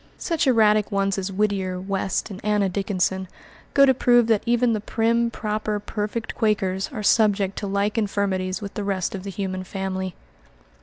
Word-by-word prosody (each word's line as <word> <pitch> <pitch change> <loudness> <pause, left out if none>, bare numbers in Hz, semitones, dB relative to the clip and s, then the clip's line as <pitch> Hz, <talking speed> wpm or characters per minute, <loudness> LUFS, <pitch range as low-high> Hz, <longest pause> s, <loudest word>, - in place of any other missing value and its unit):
Such 330 -4 -1
erratic 215 -4 +4
ones 195 0 0
as 195 +1 -3
Whittier, 190 -2 -1
West, 195 +2 -2
and 190 - -9
Anna 210 -1 +2
Dickinson 190 -1 -1 0.5
go 275 - +8
to 265 - +5
prove 240 -1 +4
that 220 -2 +2
even 240 0 +3
the 215 - -1
prim, 230 +2 +1
proper, 215 -2 -2
perfect 210 +2 -4
Quakers 195 -2 0
are 220 -6 -5
subject 200 -3 +3
to 205 - -4
like 200 +3 0
infirmities 195 -2 -1
with 200 - -6
the 210 - -4
rest 195 -2 -1
of 195 - -5
the 200 - -6
human 190 -1 -4
family. 190 -1 -4
200 Hz, 170 wpm, -23 LUFS, 190-220 Hz, 0.5 s, go